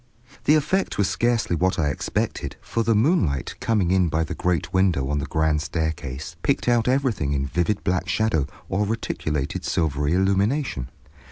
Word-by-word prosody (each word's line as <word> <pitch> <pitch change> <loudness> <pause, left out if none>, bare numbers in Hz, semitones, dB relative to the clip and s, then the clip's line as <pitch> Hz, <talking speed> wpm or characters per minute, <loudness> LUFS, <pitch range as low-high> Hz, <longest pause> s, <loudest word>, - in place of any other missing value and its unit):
The 150 - +6
effect 170 +6 0
was 100 - +2
scarcely 120 -5 +1
what 95 +3 +1
I 75 -2 +1
expected, - - -3
for 115 - -2
the 115 0 +2
moonlight, 105 - +1
coming 100 -6 +1
in 95 -2 +3
by 80 +1 +1
the 85 +3 -4
great 90 -2 -1
window 90 -8 +2
on 75 - 0
the 70 - -4
grand 80 +1 +1
staircase, 80 -2 -3
picked 140 - 0
out 120 -1 +3
everything 125 - +1
in 70 -1 0
vivid 85 +8 -1
black 90 0 0
shadow 110 -11 +1 0.2
or 100 +2 0
reticulated 75 -10 -2
silvery 75 -2 0
illumination. 95 - +1
90 Hz, 165 wpm, -24 LUFS, 75-110 Hz, 0.2 s, The